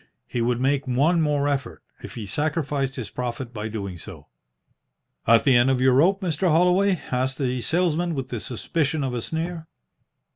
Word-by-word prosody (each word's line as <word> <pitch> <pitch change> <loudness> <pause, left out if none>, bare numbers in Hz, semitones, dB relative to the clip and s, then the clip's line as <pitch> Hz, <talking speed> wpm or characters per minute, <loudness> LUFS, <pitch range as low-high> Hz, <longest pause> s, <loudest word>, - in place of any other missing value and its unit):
He 120 - -3
would 120 +1 +1
make 135 +1 +1
one 150 +7 +2
more 145 -2 +1
effort, 140 -2 -3 0.2
if - - -9
he 110 - -5
sacrificed 145 - -1
his 120 -5 -6
profit 125 0 -4
by 105 -1 -4
doing 100 -5 -5
so. - - -11 1.0
"At 115 0 +6
the 135 - +4
end 120 +2 +5
of 130 -1 +2
your 130 0 +4
rope, 185 +9 +3
Mr. 180 0 0
Holloway?" 180 +3 +3
asked 130 +1 0
the 130 -2 -1
salesman, 170 +2 0
with 135 -2 -4
the 120 - -3
suspicion 145 +6 -2
of 130 -2 -2
a 120 - -2
sneer. 165 +3 -4
135 Hz, 180 wpm, -24 LUFS, 125-160 Hz, 1.0 s, At